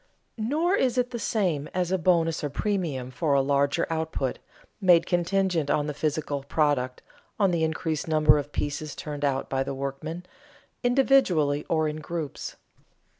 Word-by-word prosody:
Nor 305 - +1
is 260 -10 +1
it 250 0 +1
the 240 - -4
same 180 -10 0
as 180 -1 0
a 190 - +1
bonus 165 -2 +2
or 145 - -1
premium 150 -8 -2
for 140 +3 +1
a 135 - +4
larger 140 +4 +2
output, 160 -5 -2 0.4
made 175 -3 +5
contingent 175 -3 +1
on 145 - +2
the 150 - -3
physical 150 -1 -2
product, 140 -3 0 0.4
on 195 -3 +4
the 170 -2 +1
increased 160 -1 -1
number 155 -1 +5
of 145 0 -6
pieces 145 0 -3
turned 145 -1 -6
out 135 -1 0
by 135 0 -1
the 135 0 -3
workmen, 140 +6 -5 0.6
individually 245 - +3
or 160 -1 +2
in 150 0 -3
groups. 155 -2 -5
155 Hz, 160 wpm, -26 LUFS, 145-180 Hz, 0.6 s, made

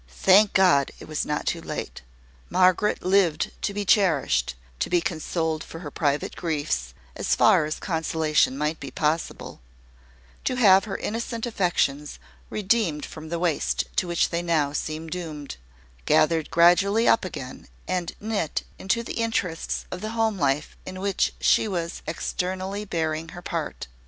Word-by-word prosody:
Thank 195 - +4
God! 175 -8 +4
it - - -11
was 155 -1 -2
not 150 0 -2
too - - -1
late. - - -6 0.5
Margaret 185 +3 +3
lived 185 -5 +2
to - - -1
be 205 0 -3
cherished, 160 - +2 0.2
to - - -1
be 175 - +3
consoled 160 -1 -2
for - - -10
her 145 -4 -7
private 145 -1 -1
griefs, 145 - -2 0.2
as - - 0
far - - +5
as 155 - -3
consolation 160 -5 +1
might 150 +2 -1
be - - -7
possible; 155 - -2 0.8
to 255 - 0
have 195 -5 +6
her 205 - -4
innocent 230 +1 -3
affections 175 - 0 0.3
redeemed 205 -7 0
from 155 0 -10
the 170 - -2
waste 170 -3 0
to 185 - +2
which 170 -1 +1
they 170 0 0
now 155 -5 +1
seemed 155 +2 -4
doomed, 155 - -6 0.5
gathered 160 -1 +3
gradually 195 +6 +4
up - - +4
again, 135 -8 -7 0.2
and 180 -2 -2
knit 205 -7 -2 0.2
into 230 +5 0
the - - -6
interests 190 -7 -2
of 180 - -5
the 215 +1 -4
home 220 -3 +1
life 140 -1 0
in 185 0 -7
which 195 0 +1
she - - +3
was 170 -4 -3
externally 190 +4 -3
bearing 160 -3 -2
her - - -7
part. - - -4
170 Hz, 155 wpm, -25 LUFS, 155-195 Hz, 0.8 s, have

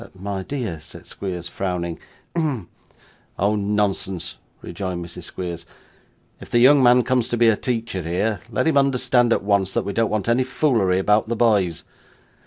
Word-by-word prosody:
'My 100 0 -4
dear,' 110 - -4
said 80 - -13
Squeers 90 -3 -6
frowning. 90 -3 -3 0.4
'Hem!' 145 - -1 0.7
'Oh! 100 +2 +2
nonsense,' 100 -3 -1 0.3
rejoined 90 -3 -4
Mrs. 85 - -9
Squeers. 85 -2 -6 0.8
'If - - -12
the - - +2
young 135 +4 +6
man 125 0 +6
comes 125 -1 +1
to 120 - -1
be 115 0 +5
a 110 - +3
teacher 115 -5 -3
here, 90 +6 -1
let 110 - 0
him 155 -3 +3
understand, 125 -3 +2
at - - +2
once, 100 -2 +1
that - - 0
we 100 - -3
don't 115 0 +1
want 105 -1 -2
any 120 +2 +3
foolery 125 -8 +1
about 105 +3 +2
the 115 - -1
boys. 100 -8 +2
105 Hz, 170 wpm, -22 LUFS, 95-120 Hz, 0.8 s, young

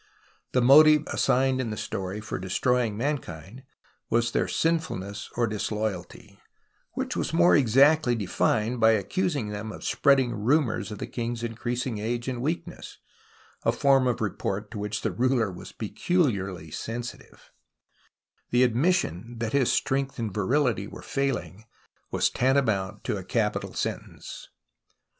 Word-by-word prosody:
The 125 - +3
motive 150 +3 +7
assigned 130 0 +2
in 120 - -3
the 105 - -4
story 95 +2 -4
for 110 - -5
destroying 115 +4 0
mankind 120 - -4 0.5
was 120 0 +1
their - - 0
sinfulness 105 - -2
or 120 - +2
disloyalty, 105 -3 -4 0.5
which - - -3
was - - -2
more 175 +1 +6
exactly 135 +1 +4
defined 110 +3 0
by 110 0 +6
accusing 140 - -1
them 105 +1 -5
of - - -10
spreading 135 -4 +3
rumours 120 +2 +1
of 105 - -6
the - - -4
king's 120 -1 -4
in 115 -1 -3
creasing 120 0 -3
age 120 +3 -3
and 125 -2 -3
weakness, 170 +4 -4 0.6
a - - +2
form 135 -2 +3
of 120 - -1
report 105 -1 -3
to 110 - -6
which 105 +1 -3
the - - -1
ruler 120 -4 +1
was 90 - -10
peculiarly 100 - -1
sensitive, 120 +6 -7
because - - -42
the 125 +1 +4
admission 120 - 0
that 115 -1 -3
his 140 -3 +3
strength 135 0 0
and 110 -5 -3
virility 115 0 +1
were - - -10
failing 110 - -3 0.4
was - - +1
tantamount 120 -8 +1
to - - -2
a - - -6
capital - - -1
sentence. - - -5
120 Hz, 145 wpm, -26 LUFS, 105-135 Hz, 0.6 s, motive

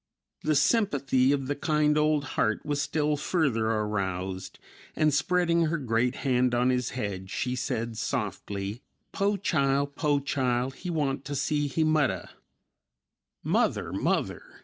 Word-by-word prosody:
The 155 0 +1
sympathy 140 - +3
of 140 -2 0
the 145 +2 -2
kind 150 0 +2
old 150 -1 +2
heart 110 +4 0
was 145 -1 0
still 150 +1 0
further 140 -8 +1
aroused 95 -4 -2 0.4
and, 155 -1 +2
spreading 170 +2 +2
her 165 +2 0
great 125 -2 0
hand 125 -2 +2
on 125 +1 +3
his 125 -1 0
head, 95 -5 -4
she 125 +5 -2
said 115 -2 -3
softly, 100 -2 -3 0.3
"Po 200 +1 +1
chile, 140 -7 +1
po 145 0 0
chile, 130 -2 0
he 180 - -6
want 140 -5 -1
ta 145 +1 -5
see 145 +1 0
he 160 +3 0
muddah." 150 - +1 1.1
"Mother, - - +1
Mother!" - - 0
140 Hz, 140 wpm, -28 LUFS, 120-150 Hz, 1.1 s, sympathy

